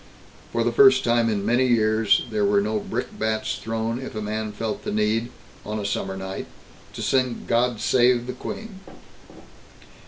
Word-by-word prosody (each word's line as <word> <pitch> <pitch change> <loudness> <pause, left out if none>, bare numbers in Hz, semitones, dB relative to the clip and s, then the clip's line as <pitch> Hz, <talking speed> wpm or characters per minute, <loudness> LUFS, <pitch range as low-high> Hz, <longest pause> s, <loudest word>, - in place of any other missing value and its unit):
For - - 0
the - - +1
first 410 -1 +6
time 120 -1 +2
in 100 -2 -1
many 120 +4 +3
years, 110 -3 +3
there 210 -1 0
were 200 0 +3
no 215 +1 0
brickbats 110 - -3
thrown 115 +1 -2
if 130 -3 -7
a - - -2
man 110 0 -3
felt 110 +1 -4
the - - -3
need, 110 +3 0 0.3
on 105 +1 -4
a 105 - -4
summer 95 -1 -2
night, 95 0 -6 0.5
to - - -5
sing 130 -3 0
"God 120 -1 +1
Save 125 -1 +3
the 125 - -4
Queen." 220 -4 -7
115 Hz, 165 wpm, -24 LUFS, 110-130 Hz, 0.5 s, first